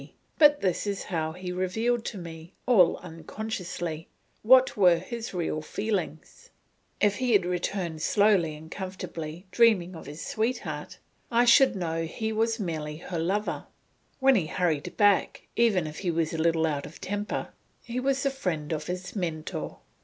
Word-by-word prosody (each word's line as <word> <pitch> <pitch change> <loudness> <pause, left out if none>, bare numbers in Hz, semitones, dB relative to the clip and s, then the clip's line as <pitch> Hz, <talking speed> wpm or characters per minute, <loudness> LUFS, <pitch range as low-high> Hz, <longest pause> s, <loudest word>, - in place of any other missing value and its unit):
But 295 -1 +6
this 190 +1 0
is 200 -1 -2
how 160 -1 -1
he 180 +1 -6
revealed 220 +6 0
to 215 - -4
me, 165 -1 -9
all 195 -9 +5
unconsciously, 170 -1 -5 0.3
what 260 +3 +6
were 180 -4 +5
his 230 +6 -6
real 165 -4 -2
feelings; 185 -3 -4 0.5
if 205 -1 +3
he 255 -2 +1
had 200 -4 +4
returned 175 -2 -2
slowly 195 -5 +3
and 160 +2 -12
comfortably, 180 -3 -6
dreaming 210 -7 +4
of 160 - -10
his 150 +3 -7
sweetheart, 225 +4 -3 0.3
I 240 0 +4
should 260 +1 +6
know 165 -3 -2
he 220 +7 -3
was 225 +1 +1
merely 155 -5 -3
her 170 +1 -5
lover; 195 +6 -1 0.5
when 270 0 +5
he 185 -10 +1
hurried 160 -4 -1
back, 205 -3 +3
even 215 -8 +3
if 155 0 -6
he 185 - -1
was 165 -1 0
a 165 - -3
little 165 0 +3
out 145 -3 -2
of 155 - -13
temper, 205 +2 -3 0.3
he 240 +1 -3
was 275 +1 0
the 275 - +2
friend 165 - -3
of 155 -1 -4
his 180 +3 -5
Mentor. 165 -5 -4
185 Hz, 160 wpm, -27 LUFS, 165-220 Hz, 0.5 s, But